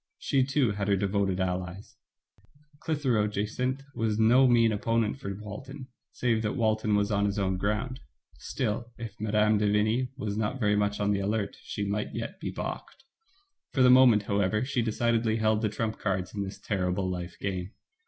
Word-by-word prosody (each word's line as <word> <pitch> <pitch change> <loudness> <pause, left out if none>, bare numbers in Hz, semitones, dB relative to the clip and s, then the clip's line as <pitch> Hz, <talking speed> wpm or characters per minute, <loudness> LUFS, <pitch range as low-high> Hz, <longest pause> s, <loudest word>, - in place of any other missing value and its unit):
She, 135 -2 +1
too, 135 -3 +1
had 100 -1 -3
her 100 - +3
devoted 100 -1 0
allies; 90 +1 -3 0.8
Clitheroe 130 -10 +1
Jacynth 125 +6 -2
was 110 -2 -1
no 120 +4 +5
mean 115 -2 +4
opponent 115 +3 0
for 100 -7 -5
Walton, 130 +7 -9 0.2
save 115 -3 0
that 105 +2 -2
Walton 110 -3 +1
was 105 +1 +1
on 100 0 +2
his 100 - -2
own 95 -2 0
ground. 105 +7 -2 0.4
Still, 115 - -3
if 115 -3 -6
Mme. 105 0 +2
de 105 -1 +2
Vigny 110 +5 +1
was 105 -6 -3
not 110 +5 -1
very 105 -3 +2
much 105 0 0
on 105 0 +1
the 100 - +1
alert 100 +1 -1
she 100 - -4
might 105 +1 -2
yet - - -5
be - - -4
balked. - - -6 0.7
For 130 - +3
the 125 - +7
moment, 125 -5 +6
however, 100 +3 0
she 130 -2 0
decidedly 115 0 +1
held 110 -1 +2
the 110 - +1
trump 110 +1 -3
cards 95 -4 -2
in 100 - -3
this 95 0 -5
terrible 95 -1 -1
life 90 -1 -5
game. 95 -2 -3
105 Hz, 180 wpm, -28 LUFS, 100-115 Hz, 0.8 s, the